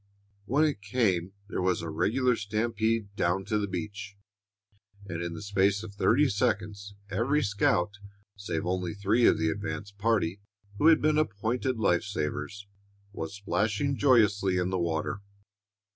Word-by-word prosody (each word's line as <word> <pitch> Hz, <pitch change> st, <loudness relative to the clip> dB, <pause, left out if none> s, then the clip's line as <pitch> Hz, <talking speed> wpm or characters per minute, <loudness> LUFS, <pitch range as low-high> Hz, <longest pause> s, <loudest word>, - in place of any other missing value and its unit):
When 140 Hz, +8 st, +2 dB
it 145 Hz, -9 st, -1 dB
came, 100 Hz, -4 st, 0 dB
there 100 Hz, -, -3 dB
was 90 Hz, -2 st, +1 dB
a 85 Hz, -, -4 dB
regular 125 Hz, +10 st, +2 dB
stampede 110 Hz, 0 st, -1 dB
down 95 Hz, +1 st, 0 dB
to 105 Hz, -, 0 dB
the 100 Hz, -, -1 dB
beach, 100 Hz, 0 st, -6 dB, 0.9 s
and 85 Hz, -4 st, -5 dB
in 85 Hz, -1 st, -4 dB
the 80 Hz, -, -7 dB
space 100 Hz, 0 st, +1 dB
of 105 Hz, -2 st, -8 dB
thirty 120 Hz, +8 st, +3 dB
seconds 100 Hz, -1 st, -1 dB, 0.2 s
every 130 Hz, +9 st, +1 dB
scout, 100 Hz, -3 st, +1 dB, 0.4 s
save 90 Hz, -5 st, -4 dB
only 90 Hz, 0 st, -2 dB
three 105 Hz, +4 st, +3 dB
of -, -, +4 dB
the 80 Hz, -, +1 dB
advance 100 Hz, +1 st, -5 dB
party, 100 Hz, -3 st, 0 dB, 0.4 s
who 155 Hz, -, +4 dB
had 165 Hz, -2 st, +6 dB
been 155 Hz, 0 st, +3 dB
appointed 120 Hz, 0 st, -1 dB
life 90 Hz, -5 st, +2 dB
savers, 100 Hz, 0 st, -4 dB, 0.5 s
was 80 Hz, -1 st, -5 dB
splashing 105 Hz, +6 st, 0 dB
joyously 105 Hz, -8 st, +3 dB
in 90 Hz, +1 st, 0 dB
the 95 Hz, -, 0 dB
water. 85 Hz, +4 st, -2 dB
100 Hz, 150 wpm, -28 LUFS, 95-115 Hz, 0.9 s, had